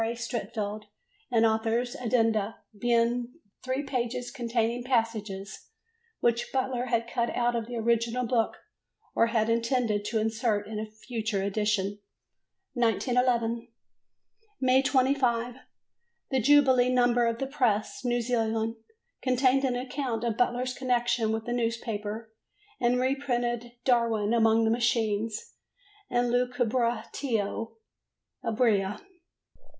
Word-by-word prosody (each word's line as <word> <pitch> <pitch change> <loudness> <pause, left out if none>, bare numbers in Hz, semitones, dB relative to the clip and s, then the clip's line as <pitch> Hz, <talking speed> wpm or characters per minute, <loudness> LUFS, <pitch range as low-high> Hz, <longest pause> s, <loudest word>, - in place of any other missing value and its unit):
A. 230 +1 -1
Streatfeild 215 -3 -4 0.5
and 230 -2 +4
author's 225 +2 +1
addenda, 225 -3 +1 0.2
being 240 +2 +1 0.3
three 260 +2 -1
pages 245 -2 -3
containing 235 0 -1
passages 220 -5 -2 0.5
which 235 0 +1
Butler 260 -2 -1
had 235 -2 0
cut 235 0 -1
out 240 0 +1
of 230 -1 -2
the 245 - -6
original 235 +2 +1
book 230 -1 0 0.6
or 230 - +3
had 225 -2 +1
intended 230 -2 +1
to 215 +2 -1
insert 220 -1 0
in 215 0 -5
a 215 - -4
future 220 -2 -3
edition. 205 0 0 0.7
1911. 240 -1 +1 0.9
May 260 0 +4
25. 255 -3 +1 0.7
The 265 -1 +2
jubilee 260 -1 +5
number 245 -1 +3
of 230 0 -1
the 270 - -2
Press, 250 -4 0
New 240 -1 +1
Zealand, 225 -1 0 0.4
contained 255 +1 +3
an 255 -2 +1
account 250 -2 -3
of 230 -2 0
Butler's 245 +1 0
connection 240 -3 +1
with 220 0 -2
the 240 - -2
newspaper 225 -2 -3 0.5
and 245 +1 +2
reprinted 245 -3 -1
"Darwin 230 -4 +2
among 225 -1 +4
the 220 - +2
Machines" 225 -2 0 0.6
and 245 -1 +1
"Lucubratio 240 -2 -1 0.7
Ebria." 215 -4 +1
235 Hz, 115 wpm, -28 LUFS, 225-250 Hz, 0.9 s, jubilee